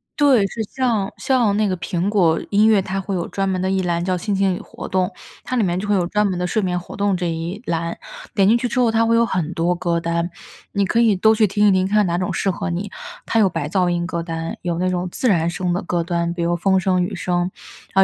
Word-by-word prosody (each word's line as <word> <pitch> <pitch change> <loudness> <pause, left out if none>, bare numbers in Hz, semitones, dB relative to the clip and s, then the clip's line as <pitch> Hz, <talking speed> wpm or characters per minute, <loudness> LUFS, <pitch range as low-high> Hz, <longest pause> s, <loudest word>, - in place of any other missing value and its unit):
对， 260 -9 +4
是 220 +2 -4
像 230 -7 0
像 240 -6 +2
那 215 - +2
个 185 -2 -1
苹 180 +2 -2
果 175 -6 +2
音 210 +1 +5
乐， 215 -3 +5
它 190 +1 -3
会 195 +1 -4
有 175 -2 -2
专 195 0 -2
门 185 -1 -1
的 190 - 0
一 190 -1 +1
栏 170 -1 0
叫 185 -1 0
心 205 +3 -2
情 190 -2 +2
与 - - -6
活 - - -9
动， 185 +1 0 0.3
它 255 - -3
里 235 - +2
面 180 -1 0
就 205 - -4
会 205 - +2
有 175 -2 +1
专 210 +2 +1
门 185 -2 -2
的 180 - -1
睡 215 - 0
眠 180 -2 -1
活 175 - -10
动 200 -1 +1
这 175 -1 -1
一 165 +6 -4
栏， 170 0 -2 0.4
点 195 -2 +4
进 230 +3 +5
去 245 - -1
之 245 +2 -1
后 245 -2 +4
它 225 +1 +2
会 230 - +3
有 230 - +4
很 180 -6 -2
多 170 +2 +1
歌 170 -1 -1
单， 170 0 -1 0.4
你 200 -1 +1
可 230 - +1
以 225 -3 +4
都 220 +4 +4
去 215 -1 +4
听 205 +2 +2
一 200 - +6
听， 185 0 +2
看 210 +2 +1
看 205 -3 +3
哪 170 - 0
种 180 0 -2
适 195 - 0
合 185 - -4
你。 190 +4 -3 0.4
它 225 - +2
有 205 - +5
白 165 -4 -3
噪 180 -1 +1
音 175 0 -1
歌 170 -2 -3
单， 165 -1 -4
有 170 -1 -2
那 185 +1 +1
种 180 0 -1
自 255 - -1
然 170 -4 +2
声 180 0 -2
的 180 - -1
歌单， 170 -1 -1
比 175 - -4
如 175 0 +1
风 190 +2 +2
声 185 -1 +1
雨 190 +4 -4
声， 175 0 -1 0.4
然 195 - +6
185 Hz, 300 characters per minute, -20 LUFS, 175-205 Hz, 0.4 s, 一